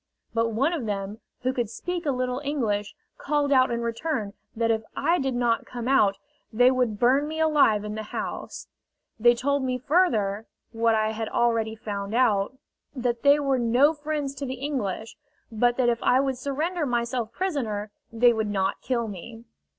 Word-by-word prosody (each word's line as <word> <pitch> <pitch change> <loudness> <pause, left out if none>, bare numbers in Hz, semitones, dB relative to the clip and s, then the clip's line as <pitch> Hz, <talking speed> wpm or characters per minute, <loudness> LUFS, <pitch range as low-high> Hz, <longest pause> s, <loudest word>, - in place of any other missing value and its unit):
But 230 0 +1
one 270 +9 +1
of 275 -10 -3
them, 200 +1 -4 0.2
who 255 +1 +1
could 240 -4 -2
speak 350 +7 -4
a - - +3
little 255 0 -2
English, 220 -8 -1 0.2
called 290 -1 0
out 260 -1 +5
in 235 -1 -2
return 230 -3 -2 0.2
that 230 0 +1
if 220 -1 +1
I 335 +5 +2
did 270 -2 -1
not 240 -1 +1
come 240 -1 -5
out 210 -7 +3 0.3
they 245 +3 +5
would 250 -5 0
burn 270 +4 +3
me 315 +1 -5
alive 290 -10 +4
in 210 0 -5
the 215 0 -5
house. - - -5 0.5
They 240 +2 +5
told 280 +3 0
me 255 -1 -1
further 225 - +1 0.2
what 230 0 +2
I 215 0 +1
had 220 0 -4
already 230 -2 +1
found 205 -1 -5
out 235 -1 +2 0.4
that 240 -2 -1
they 285 +1 +5
were 275 -3 +1
no 245 +6 +4
friends 295 -2 -3
to 280 - -4
the 260 - -3
English, 245 -6 -4 0.3
but 240 +2 +2
that 255 -2 +2
if 235 -1 +1
I 255 - +4
would 265 -2 -1
surrender 305 +4 -2
myself 235 -1 -1
prisoner 230 - -2 0.2
they 240 +1 +4
would 220 -2 -1
not 195 -1 -1
kill 240 -2 -1
me. 220 +4 -9
240 Hz, 180 wpm, -26 LUFS, 220-275 Hz, 0.5 s, out